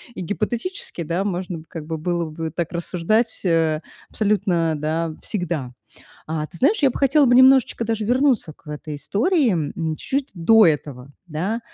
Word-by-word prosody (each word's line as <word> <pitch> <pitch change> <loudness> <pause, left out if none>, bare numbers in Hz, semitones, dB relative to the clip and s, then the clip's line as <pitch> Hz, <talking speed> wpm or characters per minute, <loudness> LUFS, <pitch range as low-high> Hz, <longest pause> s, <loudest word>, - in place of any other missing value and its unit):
и - - -5
гипотетически, 225 - -3
да, 170 +5 -1
можно, 180 -4 -3
как 160 -2 -8
бы, 160 +1 -4
было 170 0 -1
бы 160 +1 -4
так 170 0 -3
рассуждать, 180 +6 0
э, 165 -2 +2 0.3
абсолютно, 195 -6 +1
да, 160 +2 -2
всегда. 165 - -3 0.5
А 155 -1 -2
ты 170 - -11
знаешь, 365 - +2
я 275 - +5
бы - - -6
хотела 280 +1 +4
бы 245 - +4
немножечко 260 -2 +5
даже 220 -1 -1
вернуться 250 - +2
к 155 - -31
этой 150 0 -6
истории, 245 - +1
м, 160 0 -2
чу 275 - -1
чуть 280 - -7
до 215 +5 +5
этого 140 -4 -1 0.2
да. 180 +9 -2
175 Hz, 170 wpm, -22 LUFS, 160-225 Hz, 0.5 s, я